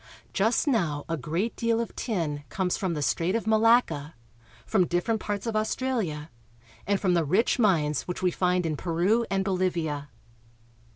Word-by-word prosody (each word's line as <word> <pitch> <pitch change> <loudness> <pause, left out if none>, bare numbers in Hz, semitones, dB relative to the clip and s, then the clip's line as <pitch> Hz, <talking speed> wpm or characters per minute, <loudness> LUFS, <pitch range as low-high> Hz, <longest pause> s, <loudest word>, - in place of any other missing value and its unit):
Just 220 +4 +2
now 170 - 0
a 165 - -1
great 165 - -2
deal 230 0 +1
of 235 - -4
tin 160 - -2
comes 185 -2 -1
from 185 -4 -2
the 150 - -2
Strait 165 - 0
of 230 - -1
Malacca, 220 -9 +3 0.5
from 175 - +2
different 180 +6 0
parts 205 0 -3
of 225 -2 -2
Australia, 215 - -1 0.6
and 200 -1 +2
from 185 -3 +2
the 170 -2 +3
rich 190 - +2
mines 155 - +2
which 180 +1 -4
we 180 - +3
find 180 0 +1
in 155 -2 -1
Peru 185 +9 +1
and 195 -1 0
Bolivia. 170 -6 -1
185 Hz, 165 wpm, -27 LUFS, 160-220 Hz, 0.6 s, Malacca